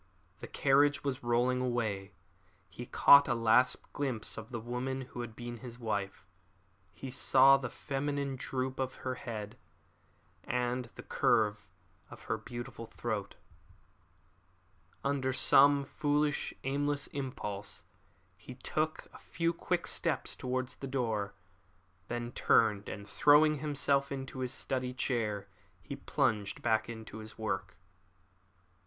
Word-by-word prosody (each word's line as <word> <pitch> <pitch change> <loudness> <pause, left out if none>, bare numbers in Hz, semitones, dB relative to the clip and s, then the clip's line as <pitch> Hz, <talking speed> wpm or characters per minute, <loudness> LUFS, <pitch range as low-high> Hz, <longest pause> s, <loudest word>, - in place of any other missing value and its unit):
The - - -7
carriage 145 +1 +3
was 140 -1 -2
rolling 125 +2 +2
away. 110 -6 -2 0.5
He 120 - -9
caught 140 0 +7
a 120 - +1
last 115 +2 +4 0.2
glimpse 130 -6 -3
of 110 +1 -8
the 120 -2 -4
woman 125 +3 -3
who 125 -1 -7
had 115 -2 -7
been 120 0 -6
his 120 0 -9
wife. 100 -5 -3 0.7
He 130 +7 -8
saw 135 +1 +6
the 135 -3 -2
feminine 140 +1 -2
droop 130 0 -3
of 130 -1 -2
her 130 - 0
head, 115 -2 -6 0.8
and 125 0 -1
the - - -9
curve 105 -3 +1 0.4
of - - -12
her - - -2
beautiful 120 -1 -7
throat. - - -4 1.7
Under 140 -2 0
some 140 +2 +6
foolish, 145 +1 0
aimless 145 +1 0
impulse, 105 -7 -5 0.5
he - - -11
took - - -2
a - - -12
few 170 0 -1
quick - - -1
steps - - -1
towards 130 0 -3
the 135 - -6
door. 110 -6 -1 0.7
Then 120 0 -3
he 120 - -7
turned, 110 -4 +3
and 100 0 -7
throwing 150 +3 +5
himself 140 -2 +1
into 135 -1 -5
his 130 -1 -2
study 130 -1 -2
chair 110 -5 -1 0.3
he - - -7
plunged 105 -2 -1
back 110 -1 +2
into 110 -1 -8
his 110 0 -9
work. 110 -1 -3
125 Hz, 130 wpm, -32 LUFS, 115-135 Hz, 1.7 s, caught